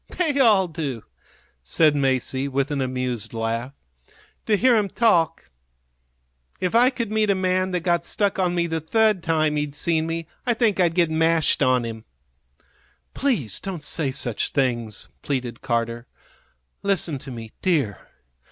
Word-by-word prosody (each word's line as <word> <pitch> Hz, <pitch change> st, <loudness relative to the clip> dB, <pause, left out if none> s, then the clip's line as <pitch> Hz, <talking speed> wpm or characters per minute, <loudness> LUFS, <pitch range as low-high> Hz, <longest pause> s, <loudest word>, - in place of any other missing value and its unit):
"They 310 Hz, -6 st, +1 dB
all 210 Hz, -7 st, +5 dB
do," 150 Hz, -9 st, -5 dB, 0.6 s
said 145 Hz, -, +3 dB
Masie, 135 Hz, -1 st, 0 dB
with 140 Hz, +1 st, -1 dB
an 140 Hz, -2 st, -1 dB
amused 125 Hz, -3 st, -3 dB
laugh, 115 Hz, +3 st, -2 dB, 0.8 s
"to 215 Hz, -2 st, +3 dB
hear 255 Hz, +4 st, +4 dB
'em 210 Hz, -3 st, +1 dB
talk. 170 Hz, -, +1 dB, 1.1 s
If 180 Hz, -, -1 dB
I 240 Hz, +2 st, +6 dB
could 235 Hz, -5 st, -4 dB
meet 215 Hz, -1 st, +1 dB
a 200 Hz, -, +4 dB
man 185 Hz, 0 st, 0 dB
that 180 Hz, -2 st, -1 dB
got 170 Hz, 0 st, +1 dB
stuck 200 Hz, +1 st, -1 dB
on 180 Hz, -1 st, +1 dB
me 170 Hz, -1 st, +1 dB
the 165 Hz, -1 st, -2 dB
third 215 Hz, +3 st, +2 dB
time 155 Hz, -2 st, +1 dB
he'd 150 Hz, -1 st, -3 dB
seen 160 Hz, 0 st, 0 dB
me 165 Hz, 0 st, -3 dB, 0.2 s
I 240 Hz, -2 st, +1 dB
think 220 Hz, -4 st, +1 dB
I'd 170 Hz, -2 st, +2 dB
get 170 Hz, -3 st, +2 dB
mashed 160 Hz, -1 st, +2 dB
on 130 Hz, -2 st, +3 dB
him." 110 Hz, -1 st, -7 dB, 1.1 s
"Please 200 Hz, -, -1 dB
don't 180 Hz, -6 st, -6 dB
say 150 Hz, -1 st, -1 dB
such 120 Hz, -3 st, -2 dB
things," 120 Hz, -6 st, -1 dB
pleaded 125 Hz, -4 st, -3 dB
Carter. 115 Hz, 0 st, -2 dB, 0.7 s
"Listen 180 Hz, -7 st, -1 dB
to 135 Hz, -, -10 dB
me, 115 Hz, -3 st, -8 dB
dear. 145 Hz, -, +1 dB
160 Hz, 155 wpm, -23 LUFS, 130-190 Hz, 1.1 s, I